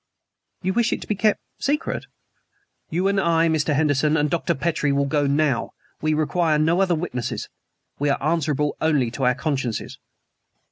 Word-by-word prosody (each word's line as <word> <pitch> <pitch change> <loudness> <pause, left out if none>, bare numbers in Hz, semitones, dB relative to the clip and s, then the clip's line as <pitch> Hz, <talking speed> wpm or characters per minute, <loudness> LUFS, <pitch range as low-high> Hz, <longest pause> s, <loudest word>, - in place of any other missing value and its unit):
"You 190 +1 0
wish 235 +2 +2
it - - -1
to - - -8
be - - +1
kept 210 +2 +2 0.2
secret?" 295 +3 -1 0.8
"You 180 +4 0
and 200 0 +2
I, 165 -1 +3
Mr. 155 -2 +1
Henderson, 150 +1 +2
and 150 -1 +1
Dr. 170 - 0
Petrie 150 0 0
will 140 0 +2
go 145 0 +1
now. 140 -3 +1 0.3
We 155 0 +1
require 155 +1 +1
no 165 +5 +2
other 180 -3 +2
witnesses. 140 -8 -4 0.5
We 145 +1 +1
are 140 - +2
answerable 150 -2 0
only 145 -7 +2
to 130 +2 -2
our 125 0 +3
consciences." 135 -5 -3
155 Hz, 170 wpm, -23 LUFS, 140-170 Hz, 0.8 s, I